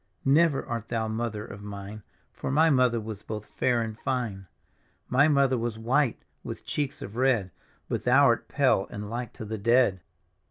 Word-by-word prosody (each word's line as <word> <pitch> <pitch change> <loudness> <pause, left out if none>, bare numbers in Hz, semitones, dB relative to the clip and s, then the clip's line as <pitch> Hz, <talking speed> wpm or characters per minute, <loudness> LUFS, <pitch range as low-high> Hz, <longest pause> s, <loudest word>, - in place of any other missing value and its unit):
" - - -47
" - - -39
Never 145 +1 +3
art 115 -1 -4
thou 115 -1 -1
mother 110 -1 -3
of 100 0 -10
mine, 100 +1 -8 0.3
For - - -5
my 155 +4 +4
mother 125 -3 +3
was 110 -2 -7
both 105 -1 -6
fair 120 0 0
and 110 -1 -5
fine. 110 -6 -3 0.3
" - - -41
My 135 +4 +4
mother 140 -4 +3
was 115 -1 -3
white, 120 +3 +1 0.2
with - - -7
cheeks 145 -2 -3
of 100 - -8
red, 120 -7 +2 0.4
But - - -2
thou 135 +3 +6
art 115 -2 +2
pale 130 -5 +2
and 105 +1 -7
like 120 0 -4
to 110 - -8
the 110 0 -5
dead." 115 -3 +3
115 Hz, 195 wpm, -27 LUFS, 105-130 Hz, 0.4 s, thou